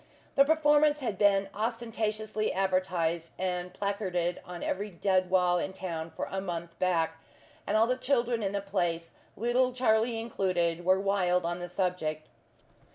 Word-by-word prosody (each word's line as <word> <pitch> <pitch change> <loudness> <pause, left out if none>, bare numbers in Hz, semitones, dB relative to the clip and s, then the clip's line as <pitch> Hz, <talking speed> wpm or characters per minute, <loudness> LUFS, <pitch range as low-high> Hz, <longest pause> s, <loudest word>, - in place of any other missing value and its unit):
The 275 - +6
performance 300 -1 +4
had 235 -9 -3
been 200 -1 +4
ostentatiously 215 -1 -2
advertised 180 -3 0
and 180 -1 -2
placarded 185 -4 -2
on 175 -1 -8
every 205 +3 -2
dead 185 0 +1
wall 180 -1 +3
in 190 +2 -3
town 165 -4 -5
for - - -4
a 190 - -2
month 170 -2 -5
back, 165 -3 0 0.5
and - - +2
all 220 - +5
the 250 +2 +1
children 245 -3 +1
in 200 -1 -1
the 200 - -1
place, 175 -4 -2 0.2
little 245 +3 +2
Charlie 230 -2 +2
included, 180 -6 -1
were 185 +2 +4
wild 185 -3 +1
on 175 +1 -2
the 175 - -5
subject. 175 -4 -2
190 Hz, 155 wpm, -29 LUFS, 175-220 Hz, 0.5 s, The